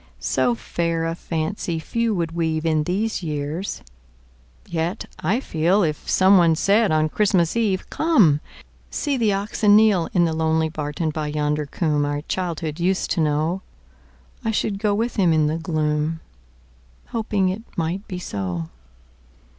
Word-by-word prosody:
So 125 -2 +1
fair 165 +6 -2
a 165 - -1
fancy 165 +1 -3
few 230 +7 -1
would 170 -2 -1
weave 160 -1 -1
In 155 -2 +1
these 205 +5 -1
years! 155 +3 -4 0.8
Yet, 170 +5 -2
I 195 +10 +1
feel, 180 -2 +1
If 155 -3 -2
someone 185 -4 +5
said 200 +4 +3
on 155 0 +3
Christmas 180 -1 +1
Eve, 210 -5 0
"Come; 215 - +4 0.5
see 290 -2 -1
the 225 -5 +2
oxen 205 +1 +2
kneel,"In 195 -5 +4
the 165 - 0
lonely 160 0 +1
barton 155 +1 -3
by 155 0 -3
yonder 150 0 -1
coomb 150 -1 0
Our 145 0 -1
childhood 165 -3 -3
used 185 +2 0
to 165 - +1
know,"I 160 - -4
should 210 -2 -1
go 205 -1 +1
with 230 +3 -2
him 180 -5 +4
in 155 -1 +3
the 155 +2 0
gloom, 155 -1 -1 0.9
Hoping 210 -4 0
it 190 +4 -3 0.2
might 175 +5 -2
be 185 - -5
so. 90 - -4
165 Hz, 145 wpm, -22 LUFS, 155-195 Hz, 0.9 s, someone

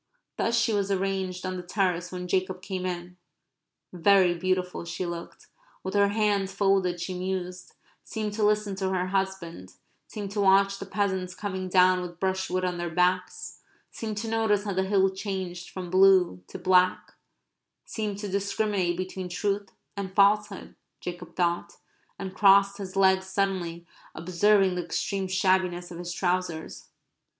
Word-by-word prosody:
Thus 235 0 +1
she 230 -1 +2
was 200 -1 0
arranged 190 -1 -2
on 185 0 -3
the - - -4
terrace 180 -1 -1
when 180 -1 -5
Jacob 185 0 -1
came 185 -1 -3
in. 180 0 -6 0.8
Very 185 0 +4
beautiful 180 +1 -1
she 170 +2 -4
looked. 170 -1 -7 0.4
With 190 - -4
her 200 0 +4
hands 205 -2 +1
folded 195 -3 +1
she 175 +2 -4
mused, 180 0 -4 0.3
seemed 215 -2 -4
to 215 0 -1
listen 210 -1 +2
to 190 -1 -1
her 185 -1 -1
husband, 190 - -3 0.3
seemed 205 -2 -6
to 205 0 -1
watch 195 0 +4
the 195 - -7
peasants 190 -3 -1
coming 190 -2 -4
down 185 0 +5
with 175 -1 -8
brushwood 190 -1 -1
on 180 -1 -2
their 175 0 -2
backs, 180 +1 -1 0.3
seemed 215 -2 -5
to 225 +2 -3
notice 220 -2 +1
how 205 -1 -3
the 190 +1 0
hill 195 -1 +3
changed 190 -3 -5
from 180 -2 -7
blue 185 - +5
to - - -8
black, 185 0 +2 0.7
seemed 210 -3 -4
to 205 0 -5
discriminate 200 -2 0
between 185 0 -5
truth 200 +2 -2 0.3
and 190 -2 -5
falsehood, 205 0 +2 0.3
Jacob 175 -1 -7
thought, 175 -1 0 0.4
and 190 -1 -6
crossed 200 0 +5
his 190 -1 -7
legs 190 -1 +3
suddenly, 185 -3 -2 0.3
observing 190 +3 +3
the 180 0 -2
extreme 195 +2 -2
shabbiness 185 -2 +1
of 170 - -8
his 175 0 -5
trousers. 180 -2 -2
190 Hz, 155 wpm, -27 LUFS, 180-200 Hz, 0.8 s, down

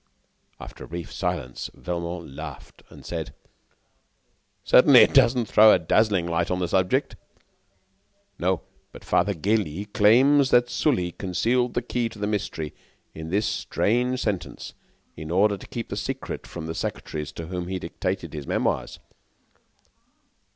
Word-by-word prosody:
'" - - -43
After - - -10
a - - -16
brief 85 0 -7
silence, 60 -1 -3
Velmont 85 -2 -5
laughed 70 - -9
and - - -14
said: - - -5 1.3
"Certainly, 130 0 +7
it - - +5
doesn't 125 -3 +4
throw 110 0 +7
a - - +6
dazzling 105 -5 +2
light 85 0 0
upon 90 - 0
the 90 -1 -1
subject." 90 +1 +1 1.2
"No; 90 0 0 0.3
but - - -13
Father 100 +3 +1
Gélis 100 +1 -1
claims 130 +6 +5
that 120 -1 +3
Sully 120 - +1
concealed 120 +8 0
the 120 - 0
key 120 -1 -1
to 110 - -13
the 105 - -2
mystery 95 -7 -3 0.4
in 80 0 -7
this 100 +4 +1
strange 125 +4 0
sentence 100 -5 -4 0.4
in 80 0 -8
order 100 +4 +3
to 95 - -12
keep 115 -2 -6
the - - -4
secret - - -5
from 85 -2 -7
the 80 - -4
secretaries 75 -2 -4
to 85 - -7
whom 90 +1 -5
he 95 0 -3
dictated 90 -1 -4
his 75 -3 -6
memoirs." - - -1
95 Hz, 150 wpm, -25 LUFS, 85-115 Hz, 1.3 s, Certainly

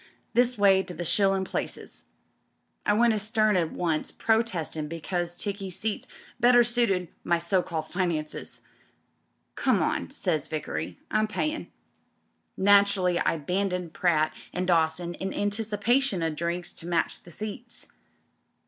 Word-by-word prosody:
This 245 0 +3
way 195 -2 +5
to 180 -2 -8
the 175 +2 -4
shillin' 195 +2 +3
places!' - - -4 0.8
I 210 - +5
went 230 +2 +4
astern 215 0 +2
at 170 -3 +1
once, 165 -3 -1
protestin' 185 -9 0
because 175 +2 -3
tickey 200 -2 -3
seats 205 +4 -3 0.3
better 245 0 +6
suited 230 -7 +1
my 170 - +2
so 170 +2 +1
called 160 -2 -4
finances. 170 -5 -1 0.9
'Come - - +2
on,' - - -1
says 155 -2 -1
Vickery, 85 - -4
Tm 215 0 +2
payin'.' 305 +8 -2 0.9
Naturally 200 -2 +4
I - - +2
abandoned 180 +2 -2
Pratt 155 -3 +2 0.2
and 180 - -2
Dawson 170 0 +1
in 190 +2 -4
anticipation 210 +1 +1
o' 165 - +1
drinks 170 +3 -3
to 165 - -6
match 170 -1 0
the - - -15
seats. 215 +6 -7
185 Hz, 130 wpm, -27 LUFS, 170-215 Hz, 0.9 s, better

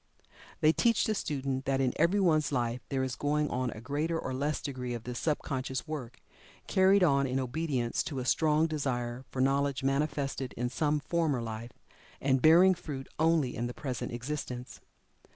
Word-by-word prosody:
They 155 - +6
teach 205 +8 +2
the 220 - +1
student 135 -7 -2
that 135 0 +1
in 130 -2 +1
everyone's 170 -3 +3
life 120 -2 -1
there 135 -1 0
is 130 -1 -2
going 150 +1 0
on 125 0 -1
a 110 - -7
greater 145 +7 -1
or 130 -5 -4
less 145 +3 -1
degree 125 -3 -4
of 115 - -7
this 125 0 -5
sub 155 -2 0
conscious 130 0 -3
work, 130 -6 -6 0.5
carried 190 +1 +4
on 140 -4 +3
in 130 +1 0
obedience 130 -2 -1
to 145 - -4
a 125 - -3
strong 155 +3 +3
desire 130 -5 -2
for 130 - -2
knowledge 140 0 +1
manifested 135 -1 -1
in 125 +1 -2
some 150 +3 0
former 160 -5 0
life, 115 +1 -6 0.5
and 135 -1 +2
bearing 175 +4 +7
fruit 150 -6 -7
only 160 -5 +2
in 120 - -2
the 120 - -7
present 130 -4 -4
existence. 125 0 -5
135 Hz, 175 wpm, -30 LUFS, 125-155 Hz, 0.5 s, bearing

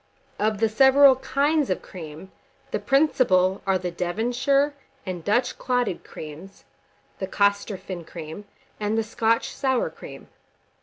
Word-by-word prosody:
Of 215 0 +1
the 225 +2 +2
several 265 +3 +6
kinds 285 +2 +1
of 185 - -2
cream, 160 +1 -10 0.4
the - - -1
principal 220 -10 +3
are 190 -1 +3
the 180 -1 -4
Devonshire 245 +11 0 0.3
and 180 -3 -5
Dutch 240 +6 0
clotted 245 -7 -1
creams, 160 +6 -10 0.6
the 190 - -3
Costorphin 200 -3 -1
cream, 165 +4 -8 0.3
and 210 +1 -1
the 225 - +2
Scotch 225 +1 0
sour 265 -3 0
cream. - - -11
210 Hz, 125 wpm, -24 LUFS, 185-255 Hz, 0.6 s, several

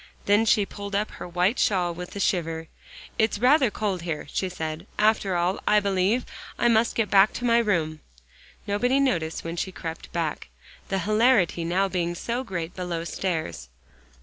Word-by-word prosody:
Then 205 +2 +4
she 210 -2 +3
pulled 200 0 -6
up 210 +1 0
her - - -8
white 180 +6 +1
shawl 180 -4 +2
with 180 +3 -8
a - - -4
shiver. 165 -4 -1 0.5
"It's 220 -1 +2
rather 255 +3 +4
cold 205 -4 -2
here," 165 -3 -4
she 190 - -1
said; 160 +1 -5
"after 210 -3 +2
all, 175 +3 0
I 210 - +5
believe 200 +4 +1 0.3
I 240 - +3
must 230 0 +3
get 225 -3 0
back 195 +1 +6
to 245 - -4
my 235 -1 +4
room." 165 -8 0 0.7
Nobody 245 +6 +1
noticed 170 -13 0
when 165 +1 -5
she 190 - -2
crept 165 -2 -7
back, 165 - -3 0.4
the 195 - 0
hilarity 215 -3 +3
now 180 +4 +1
being 175 -2 -2
so 240 +8 -3
great 175 -7 -5
below 175 -2 -3
stairs. 160 - -3
190 Hz, 175 wpm, -25 LUFS, 170-215 Hz, 0.7 s, back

